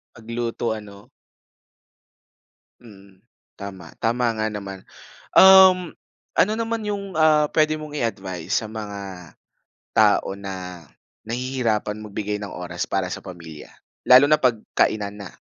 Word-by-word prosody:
Magluto 115 0 -3
ano? 105 -2 -11 1.7
Mm, 100 -4 -17 0.4
tama, 95 -4 -9
tama 120 +2 0
nga 110 - 0
naman. 100 -3 -7 0.4
Um, 190 -2 +7 0.4
ano 210 - +3
naman 230 -1 -2
yung, 200 -2 -4
ah, 155 -1 +4
pwede 155 0 +2
mong 150 -1 -8
i-advice 95 - -2
sa 110 - -7
mga 100 -5 -8 0.6
tao 105 -2 +3
na 95 -3 -8 0.4
nahihirapan 115 -3 -2
magbigay 105 0 -4
ng 105 - -6
oras 90 -1 -5
para 95 -1 -1
sa - - -7
pamilya? 85 -5 -10 0.4
Lalo 130 +2 +9
na 155 - +5
'pag 125 -3 +3 0.2
kainan 105 -1 0
na. 95 - -8
110 Hz, 120 wpm, -22 LUFS, 95-130 Hz, 1.7 s, Lalo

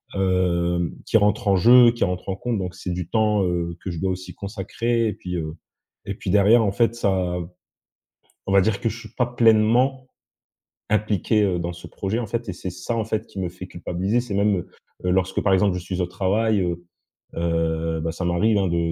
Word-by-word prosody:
hem, 85 -2 +1
qui - - +3
rentrent 105 +2 +1
en 100 - +5
jeu, 120 +5 +7
qui 120 - -2
rentrent 90 0 -2
en 95 - -1
compte. 115 +2 -2
Donc 90 -2 -4
c'est 90 - -5
du 90 -1 -4
temps, 105 -3 +2
heu, 85 -1 -2
que - - -4
je 85 - -5
dois 95 -1 0
aussi 95 0 -6
consacrer. 115 +3 -2
Et 105 - -1
puis, 90 -1 -6
heu, 80 -1 -4 0.5
et 100 - -4
puis 95 - -4
derrière 105 +3 +5
en 100 - +1
fait 115 +3 +1
ça 95 -5 0 1.1
on - - -3
va 100 - +6
dire 100 +3 +1
que 115 - +1
je 115 +2 -7
suis - - -11
pas 125 - +3
pleinement 120 +3 +3 0.8
impliqué, 105 0 +1
heu, 95 -3 +1
dans 85 +1 -3
ce 85 - -11
projet 100 +4 -3
en 120 - -4
fait, 115 0 -3
et - - -3
c'est 90 +1 -6
ça, 90 +6 -4
en 110 - -1
fait, 110 0 -3
qui - - -9
me 90 -2 -2
fait 90 +1 -10
culpabiliser. 95 +6 -1
C'est 120 -4 -6
même, 100 0 +2
heu 90 - -5 0.4
heu, 90 - +2
lorsque, 95 0 +1
par 95 - +2
exemple, 95 0 +3
je - - -2
suis 90 +1 -3
au 90 - 0
travail, 100 +3 +1
heu 85 -1 -2 0.5
heu, 80 -1 -1
bah 80 +1 -2
ça 90 +1 -4
m'arrive, 100 +5 +2
hein, 95 -1 +1
de 85 -1 0
95 Hz, 220 wpm, -23 LUFS, 90-110 Hz, 1.1 s, jeu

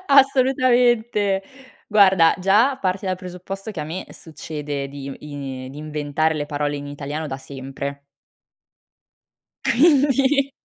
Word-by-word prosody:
Assolutamente. 245 -6 +3 0.5
Guarda, 190 -6 +5
già 210 +9 +3
parti 190 -1 -2
dal 185 - 0
presupposto 185 +3 -7
che 185 - -5
a 150 - -3
me 170 +5 -5
succede 150 -3 -6
di 140 0 -8
i 135 -3 -7
di 145 - -10
inventare 155 +1 -1
le 145 -1 -2
parole 145 0 -2
in 145 0 -7
italiano 145 +2 -5
da 135 -2 -5
sempre. 140 +1 -7 1.6
Quindi 275 0 +3
175 Hz, 120 wpm, -22 LUFS, 145-230 Hz, 1.6 s, Guarda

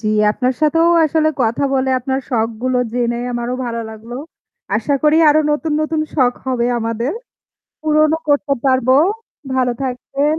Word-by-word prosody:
জ্বী, 215 - -2 0.2
আপনার 255 +2 -1
সাথেও 325 +2 +3 0.2
আসলে 310 0 +2
কথা 230 +5 0
বলে 265 0 +1
আপনার 265 +1 -2
শখগুলো 235 +2 -1
জেনে 240 -1 0 0.2
আমারও 240 +1 -3
ভালো 230 -1 -3
লাগলো। 220 +2 -10 0.6
আশা 230 +7 -1
করি 305 0 +4
আরো 300 +1 +5
নতুন, 300 +1 -1
নতুন 310 0 -1
শখ 255 -4 +3
হবে 245 -2 0
আমাদের। 230 +3 -2 0.7
পুরণও 310 +1 +3
করতে 285 0 +2
পারবো। 260 -1 +3 0.6
ভালো 255 -1 +1
থাকবেন। 275 +4 -1
260 Hz, 145 wpm, -17 LUFS, 235-300 Hz, 0.7 s, আরো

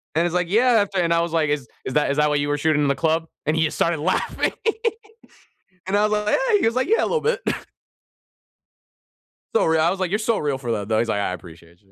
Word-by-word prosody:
And 165 - +3
he's 175 - -3
like, 180 -1 0
"Yeah," 245 +5 +4
after 195 -1 -3
and 170 -1 +2
I 165 - +3
was 170 -1 -2
like, 160 -3 +1
"Is 145 -5 -2 0.2
is 130 - -4
that 150 - +2
is 140 - -1
that 150 0 +3
what 150 -1 +1
you 145 - -2
were 145 - 0
shooting 150 0 +2
in 145 - +1
the 140 - +1
club?" 165 0 0 0.2
And 155 +2 +1
he 160 - +2
just 155 - -2
started 170 -2 +1
laughing. 150 - 0 1.3
And 195 +2 0
I 210 - +3
was 210 - -1
like, 210 0 -1 0.2
"Yeah." 440 - +4
He - - +1
was 225 +1 +1
like, 255 +2 +1
"Yeah, 450 +4 +3
a - - +1
little 475 - +1
bit." 470 +2 0 2.1
So 225 - +3
real 160 0 +2
I 165 +2 +3
was 195 - -3
like, 185 -2 -1
"You're 210 - +1
so 225 0 +1
real 145 -3 -1
for 125 -3 -5
that, 105 -2 -3
though." 110 -1 +1
He's 115 - 0
like, 100 - 0
"I 100 - -1
appreciate 85 0 -12
you." 95 - -30
160 Hz, 270 wpm, -22 LUFS, 140-195 Hz, 2.1 s, Yeah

